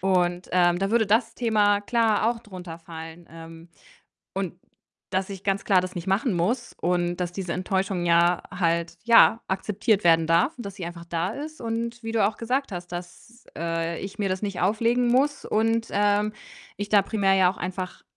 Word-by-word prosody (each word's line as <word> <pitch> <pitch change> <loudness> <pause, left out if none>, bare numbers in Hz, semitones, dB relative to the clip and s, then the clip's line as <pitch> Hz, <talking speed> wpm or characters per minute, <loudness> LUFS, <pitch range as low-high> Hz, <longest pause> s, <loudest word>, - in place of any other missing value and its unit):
und, 180 -1 +1
ähm, 175 -1 +3
da 195 +1 -1
würde 225 -2 +3
das 225 +2 +2
Thema 210 -4 +2
klar 225 0 +2
auch 235 - -4
drunter 180 -6 -9
fallen, 165 0 -10
ähm, 165 0 -12 0.7
und 190 -3 -3 0.6
dass 190 0 -1
ich 195 -1 -8
ganz 195 0 -1
klar 190 -3 +4
das 185 0 -6
nicht 175 - -5
machen 210 +5 +1
muss 190 +10 -1
und 175 0 0
dass 180 -1 -2
diese 180 -2 -5
Enttäuschung 190 -1 -1
ja 170 +1 +3
halt, 170 -1 0
ja, 230 0 +6
akzeptiert 205 +2 0
werden 165 -1 +4
darf 170 - +3
und 240 - -8
dass 195 - -9
sie 185 -4 -6
einfach 170 0 -7
da 170 +1 -2
ist 305 +2 -7
und 230 +1 -3
wie 225 - -4
du 225 -3 +2
auch 210 - -5
gesagt 255 +1 -1
hast, 175 -1 -6
dass, 180 +7 -9
äh, 165 0 -2
ich 195 +2 -8
mir 200 -2 0
das 185 +2 -2
nicht 200 -3 -3
auflegen 230 +5 +2
muss 275 +4 +1
und, 225 +1 +1
ähm, 205 +1 +2 0.5
ich 205 0 -4
da 205 -2 +5
primär 200 -1 +1
ja 185 -1 +4
auch - - -14
einfach 185 0 -5
195 Hz, 190 wpm, -25 LUFS, 175-220 Hz, 0.7 s, ja